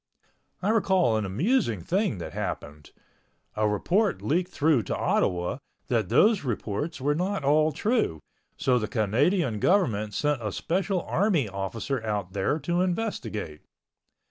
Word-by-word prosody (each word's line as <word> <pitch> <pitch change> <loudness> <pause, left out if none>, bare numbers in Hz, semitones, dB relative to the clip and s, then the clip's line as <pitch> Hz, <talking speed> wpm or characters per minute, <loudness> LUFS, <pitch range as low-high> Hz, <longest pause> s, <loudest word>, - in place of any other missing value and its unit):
I 200 - +1
recall 190 - +3
an 110 -1 0
amusing 115 - +1
thing 190 - 0
that 85 - -7
happened. 75 +1 -5 0.7
A 105 0 +1
report 185 - +1
leaked 175 +4 0
through 150 -4 +3
to - - -1
Ottawa 90 +7 0 0.3
that 110 -7 +1
those 210 -3 +4
reports 120 +5 -3
were 145 +3 +1
not 180 +1 -1
all 155 +3 +3
true, 210 - 0 0.4
so 125 -1 +2
the 105 - -2
Canadian 125 - +1
government 110 - +1
sent 145 -4 0
a 105 -2 -3
special 185 +1 -1
army 180 - +1
officer 100 +5 -3
out 105 -4 -3
there 100 +9 0
to 175 0 0
investigate. 175 - -3
140 Hz, 140 wpm, -26 LUFS, -, 0.7 s, those